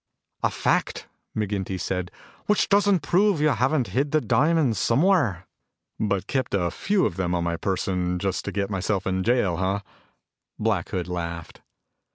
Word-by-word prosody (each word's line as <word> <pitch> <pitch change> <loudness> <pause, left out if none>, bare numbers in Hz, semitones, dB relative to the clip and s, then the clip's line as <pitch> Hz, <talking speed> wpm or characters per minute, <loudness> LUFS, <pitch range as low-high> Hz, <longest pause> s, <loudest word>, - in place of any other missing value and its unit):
"A - - +2
fact," - - -1 0.3
McGinty 100 -3 -2
said, 90 0 -2 0.4
"which 210 - +2
doesn't 200 -4 +3
prove 190 +2 +3
you 155 +1 +3
haven't 130 -3 +1
hid 135 +9 0
the 155 - +3
diamonds 140 - +2
somewhere." 120 - +2 0.5
"But 100 -3 0
kept 130 -6 -1
a 90 -3 0
few 200 -1 +1
of 85 - -2
them 90 -1 0
on 85 - 0
my 85 0 -1
person 90 0 -1
just 95 +1 -2
to - - -3
get 100 0 -2
myself 95 0 -1
in 95 0 0
jail, 110 -7 +2
huh?" 95 +2 0 0.8
Black 105 -5 0
Hood 90 -3 -3
laughed. 85 -2 -5
100 Hz, 160 wpm, -25 LUFS, 90-140 Hz, 0.8 s, doesn't